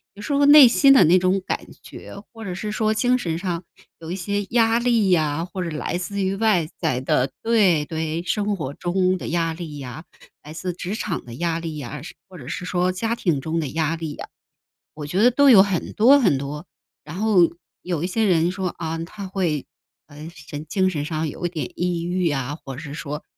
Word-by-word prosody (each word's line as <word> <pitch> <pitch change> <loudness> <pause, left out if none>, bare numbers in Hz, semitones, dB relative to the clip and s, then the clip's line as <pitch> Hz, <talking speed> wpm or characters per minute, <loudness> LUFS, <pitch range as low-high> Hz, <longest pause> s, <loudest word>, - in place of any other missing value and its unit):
有 205 - -11
时 290 - -2
候 285 0 +3
内 290 -3 +10
心 275 +3 +5
的 265 - +7
那 175 +4 +5
种 185 +1 +1
感 - - -3 0.2
觉， - - -11 0.2
或 225 -1 -10
者 185 -3 -5
是 210 +3 -4
说 215 0 +1
精 250 +2 +2
神 165 -7 -2
上 175 -1 -3 0.4
有 165 0 -8
一 180 - -2
些 200 +2 -2
压 230 -1 +3
力 235 -5 +2
呀， 160 -1 +1
或 185 +1 -6
者 170 - -3
来 175 - -2
自 200 +2 -3
于 190 +1 0
外 200 -8 +2
在 150 -7 0
的 130 0 +1
对 195 -10 +3
对， 160 +1 -3
生 205 +3 -1
活 140 -6 -5
中 185 +2 0
的 - - -6
压 165 -1 0
力 160 -3 -7
呀， 135 +3 -8 0.4
来 150 +1 -11
自 180 +2 -4
职 180 +4 -5
场 195 -6 -3
的 120 -1 -10
压 170 +1 -1
力 160 -2 -6
呀， 140 +1 -7
是 - - -10
或 185 -2 -13
者 125 - -11
是 180 - -5
说 180 0 0
家 225 +5 -2
庭 165 - 0
中 160 +2 -2
的 150 - -2
压 160 +3 -1
力 160 -3 -5
呀， - - -8 0.7
我 150 -1 -7
觉 185 +7 0
得 245 - +6
都 280 +3 +4
有 210 -7 +9
很 195 -3 -2
多 270 +6 +6
很 185 - +3
多。 140 +2 -6 0.4
然 155 +4 -8
后 195 -5 +4 0.3
有 175 -4 -3
一 - - +1
些 220 +4 0
人 170 -1 +3
说 185 0 -3
啊， 165 -1 -5
他 190 +4 -7
会， 175 -7 -1 0.4
呃， 150 +2 -10
神 150 0 -9
精 185 +4 +1
神 150 -5 -3
上 155 -1 -2
有 175 - -4
一 - - 0
点 155 -6 -5
抑 175 -1 -1
郁 180 -1 0
啊， 140 +1 -3
或 135 - -7
者 - - -7
是 140 - -8
说， 150 0 -6
175 Hz, 240 characters per minute, -22 LUFS, 155-200 Hz, 0.7 s, 内